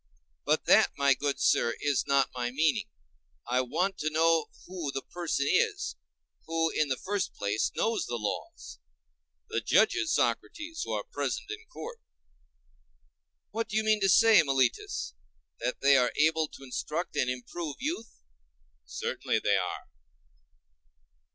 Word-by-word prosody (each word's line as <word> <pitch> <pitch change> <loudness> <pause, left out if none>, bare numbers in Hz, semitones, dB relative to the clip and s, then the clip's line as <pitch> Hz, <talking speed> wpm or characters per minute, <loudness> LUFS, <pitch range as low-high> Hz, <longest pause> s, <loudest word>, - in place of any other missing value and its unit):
But - - +1
that, - - +5
my 140 -1 +4
good 140 +2 -2
sir, 115 - +2
is 145 -2 +1
not 140 -1 +3
my 125 -1 -2
meaning. 160 - +1 0.6
I 125 +1 +1
want 180 +10 -1
to 155 - 0
know 165 +1 +3 0.2
who 175 -6 -4
the 135 0 -4
person 170 -5 -2
is, 425 - +1 0.5
who, 165 0 +1
in 155 - +1
the 130 -2 -1
first 200 +1 -2
place, 105 +1 -1
knows 225 0 0
the 120 - -3
laws. 105 -2 -5 0.7
The 115 - -1
judges, 320 - +3
Socrates, 325 0 -1
who - - -4
are - - -2
present - - -4
in 440 +1 -8
court. 475 -1 -8 1.5
What 225 0 -2
do 215 - -1
you 220 - +2
mean 215 -1 +2
to 195 - +3
say, 225 +3 +7
Meletus, 130 - 0 0.5
that 125 +2 -3
they 140 0 +6
are 125 -1 +3
able 160 +1 +3
to 135 - -13
instruct 150 +6 -4
and 125 - +1
improve 135 +5 -5
youth? 250 - -5 0.6
Certainly 65 - -2
they - - +3
are. - - -4
160 Hz, 145 wpm, -29 LUFS, 135-215 Hz, 1.5 s, say